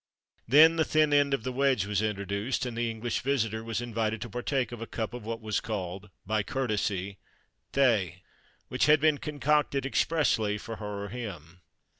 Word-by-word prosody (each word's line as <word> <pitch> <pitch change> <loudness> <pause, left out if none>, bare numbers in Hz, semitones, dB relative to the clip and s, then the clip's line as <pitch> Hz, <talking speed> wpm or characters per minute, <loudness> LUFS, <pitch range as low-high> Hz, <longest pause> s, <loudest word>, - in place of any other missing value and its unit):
Then 160 +6 +7
the 160 - +4
thin 155 -1 +2
end 145 -1 +4
of 135 -5 0
the 130 - -2
wedge 130 -5 +2
was 105 0 0
introduced, 100 +4 -2
and 120 -2 -4
the 120 0 -1
English 115 +1 -3
visitor 115 -5 -1
was 115 +1 -3
invited 110 -2 -2
to 120 - -6
partake 125 +1 -1
of 120 -2 -7
a 115 - -5
cup 110 -1 -4
of 120 -3 -7
what 115 0 -4
was 110 -1 -1
called 95 -2 -5 0.2
(by 110 +2 +1
courtesy) 100 -5 -2 0.5
thé, 105 -10 +2 0.5
which - - +1
had 150 0 +6
been 155 -1 +3
concocted 150 -2 0
expressly 130 -8 +1
for 115 +1 -7
her 105 -1 -5
or 100 - -6
him. 90 -7 -8
115 Hz, 180 wpm, -28 LUFS, 105-135 Hz, 0.5 s, Then